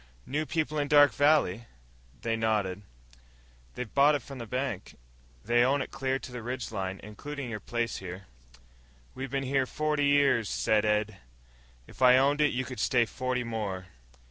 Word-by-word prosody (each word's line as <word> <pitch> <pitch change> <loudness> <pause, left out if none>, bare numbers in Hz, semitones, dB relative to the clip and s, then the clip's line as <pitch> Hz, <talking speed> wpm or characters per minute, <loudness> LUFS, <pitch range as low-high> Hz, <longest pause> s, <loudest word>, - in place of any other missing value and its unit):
"New 155 +3 -2
people 155 -2 -1
in 145 - 0
Dark 145 0 +6
Valley." 145 -8 +3 0.6
They 115 -1 0
nodded. 105 -4 0 0.9
"They've 125 -4 -6
bought 145 +2 +5
it 145 - -3
from 135 -2 -9
the 115 - -7
bank. 125 -5 -4 0.5
They 120 +2 +4
own 135 +3 +2
it 130 - -4
clear 135 0 -1
to 130 - -10
the 125 -1 -6
ridge 125 0 -5
line, 95 -2 -4
including 130 +5 -7
your 105 - -4
place, 120 +2 -2
here." 95 +1 -8 0.9
"We 135 +1 -5
been 135 +1 -2
here 135 0 +1
forty 150 0 0
years," 140 -6 +3
said 110 -1 +1
Ed. 105 0 0 0.7
"If - - -16
I 125 0 +7
owned 140 +3 +3
it 150 - +4
you 130 +1 -2
could 130 - -7
stay 120 -2 +3
forty 125 +1 -2
more." 100 -6 -4
125 Hz, 170 wpm, -29 LUFS, 110-140 Hz, 0.9 s, I